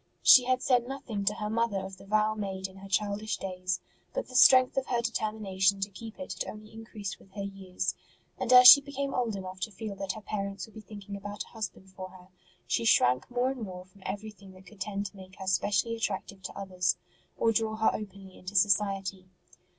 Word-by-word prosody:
She 250 - +9
had 255 0 +1
said 245 -2 +2
nothing 250 -7 -5
to 210 - +1
her 210 - -4
mother 225 -1 0
of 190 0 -6
the 195 - -15
vow 215 +1 +2
made 195 -3 -4
in 190 0 -16
her 195 0 -11
childish 205 +2 -1
days; 185 -1 -3 0.4
but - - -2
the 255 - -10
strength 255 +1 +7
of 270 -1 -1
her 240 - 0
determination 210 -4 0
to 195 +1 -3
keep 225 +3 -10
it 280 - -6
had - - -2
only 215 0 -13
increased 220 -3 -7
with - - -20
her 200 -1 -5
years; 190 -2 -3 0.5
and 255 -2 -1
as 250 0 +10
she 280 +3 +12
became 280 0 -4
old 235 -4 -1
enough 185 -1 -7
to 215 - -3
feel 205 +1 -6
that 195 -1 -3
her 215 - -9
parents 200 -3 -4
would 220 - -19
be 220 - -10
thinking 205 -1 -9
about 205 +1 -6
a - - -19
husband 200 -4 -7
for 185 0 -8
her, 185 0 -16 0.4
she 120 -1 0
shrank 125 +2 +3
more 250 +1 0
and 265 -3 -7
more 185 -3 -7
from 190 +1 -22
everything 200 -1 -7
that 185 0 -16
could 205 0 -16
tend 200 -1 -3
to 200 - -8
make 190 -1 -13
her 190 - -7
specially 205 +4 +1
attractive 200 -3 -4
to - - -7
others, 185 -2 0 0.4
or 230 - +3
draw 220 -1 0
her 220 0 +3
openly 195 -2 -8
into 185 +2 -8
society. 195 -1 +1
200 Hz, 220 wpm, -29 LUFS, 190-220 Hz, 0.5 s, she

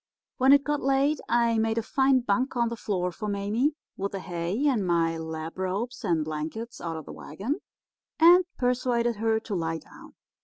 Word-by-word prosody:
"When 265 0 +5
it 280 0 +6
got 295 0 -1
late 275 +2 +2
I 235 -1 +3
made 220 0 0
a 230 - +1
fine 265 +2 +3
bunk 250 +4 0
on 235 -1 +2
the 235 - -4
floor 185 -5 -2
for 210 +5 -6
Mame 210 +8 0 0.2
with 200 +1 -3
the 195 - -3
hay 180 +8 -2
and 255 -8 +2
my 165 -2 +1
lap 160 +1 -6
robes 205 +7 -3
and 165 -6 +1
blankets 155 +10 -5
out 165 -1 -4
of 155 - -8
the - - -9
wagon, 205 - -4 0.6
and 350 +3 +8
persuaded 245 -2 +1
her 220 +1 +1
to 220 - -6
lie 165 -3 -1
down. 160 - -15
220 Hz, 190 wpm, -27 LUFS, 175-255 Hz, 0.6 s, and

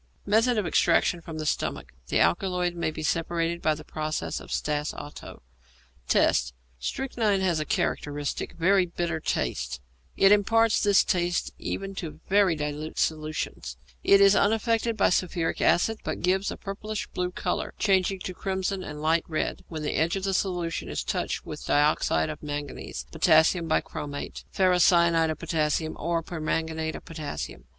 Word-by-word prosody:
Method 225 +4 +3
of 210 - +1
Extraction 175 0 +2
from 160 -1 -8
the 155 - -4
Stomach. - - -2 0.2
The - - +1
alkaloid 180 - +1
may 170 -2 -1
be 155 0 -6
separated 165 +1 -1
by 155 0 +2
the 155 - -10
process 155 0 -3
of - - -12
Stas 150 0 -1
Otto. 145 - -9 0.6
Tests. 65 +1 +3 0.3
Strychnine 215 - 0
has 175 -4 +1
a 155 - -2
characteristic, 145 -1 -2
very 185 +2 +3
bitter 170 -1 -2
taste; 65 - -2 0.4
it 195 - +6
imparts 225 +2 +4
this 205 -2 +5
taste 175 -1 0
to - - -8
even 195 0 -4 0.3
very 195 -3 +4
dilute 150 +1 -4
solutions; 155 - -2 0.3
it 200 - +6
is 200 0 +7
unaffected 225 +2 +2
by - - +4
sulphuric 175 -2 0
acid, 220 +5 +3
but - - -4
gives 190 +2 +1
a - - -5
purple 210 +2 -6 0.2
blue 180 0 -1
colour, 180 - -3
changing 195 -2 +2
to 185 - -5
crimson 190 +1 -2
and 150 -2 -7
light 160 +1 +3
red, 155 -2 -2
when 155 -2 -6
the 150 - -1
edge 165 +3 +2
of 195 - -3
this 195 -1 +2
solution 175 -3 -3
is - - -3
touched - - -2
with - - -7
dioxide 150 +1 +2
of 155 - -9
manganese, 145 - -5
potassium 165 +1 +4
bichromate, 145 -2 -3
ferricyanide 170 -3 +4
of 155 - -2
potassium, 155 -1 -1
or 165 +1 -1
permanganate 160 -1 -2
of - - -9
potassium. 150 - -6
170 Hz, 160 wpm, -27 LUFS, 155-195 Hz, 0.6 s, is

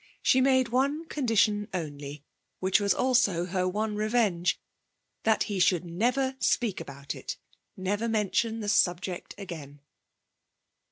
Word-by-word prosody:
She 260 - +4
made 260 -2 +3
one 280 +6 0
condition 220 -8 +1
only 145 -3 -6 0.3
(which 190 +2 +3
was 200 -1 +1
also 200 -6 +2
her 185 0 -1
one 210 +3 -1
revenge), 210 -5 +1 0.7
that 220 -1 +3
he 200 -3 -3
should 180 -1 +3
never 250 +10 0
speak 220 -6 +1
about 140 0 -7
it, - - -6 0.4
never 205 +5 -1
mention 220 +1 0
the 210 - -4
subject 180 -2 0
again. 155 -8 -8
205 Hz, 125 wpm, -28 LUFS, 180-230 Hz, 0.7 s, She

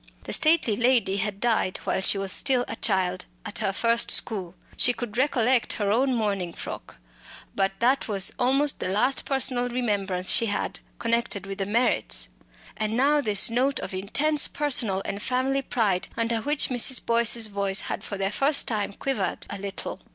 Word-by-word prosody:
The - - -5
stately 310 -9 +3
lady 235 -4 +2
had 200 0 -3
died 225 -5 0
while - - -1
she 195 - +3
was 195 -1 -1
still 255 +1 +2
a - - -5
child 185 -3 0 0.2
at 205 - -4
her 195 - 0
first 230 +3 +1
school; 190 -5 0 0.2
she 245 - +4
could 240 -3 -7
recollect 255 -2 +1
her 205 -2 -1
own 255 +4 +1
mourning 200 -6 -2
frock; - - -8 0.6
but 195 -1 0
that 255 +3 +2
was 195 -3 -2
almost 270 +3 +1
the - - -3
last 230 +8 +1
personal 255 -2 +1
remembrance 200 -7 0
she 230 - +3
had, 205 - -3 0.2
connected 230 -4 -1
with 195 +1 -7
the 195 - -2
Merritts. 205 - -1 0.5
And 215 +1 -2
now 290 +3 +3
this 210 -3 +3
note 260 +4 +1
of - - -6
intense 280 +11 +1
personal 235 -10 +1
and 200 - -4
family 260 +3 0
pride, 220 -8 -1
under 230 0 -1
which 295 +4 +1
Mrs. 255 +1 +3
Boyce's 230 0 +3
voice 200 -2 +1
had - - -4
for 200 - -6
the 195 0 -1
first 280 +6 +2
time 210 -3 -2
quivered 220 -4 -3
a - - -6
little! 200 0 -6
225 Hz, 175 wpm, -25 LUFS, 195-255 Hz, 0.6 s, she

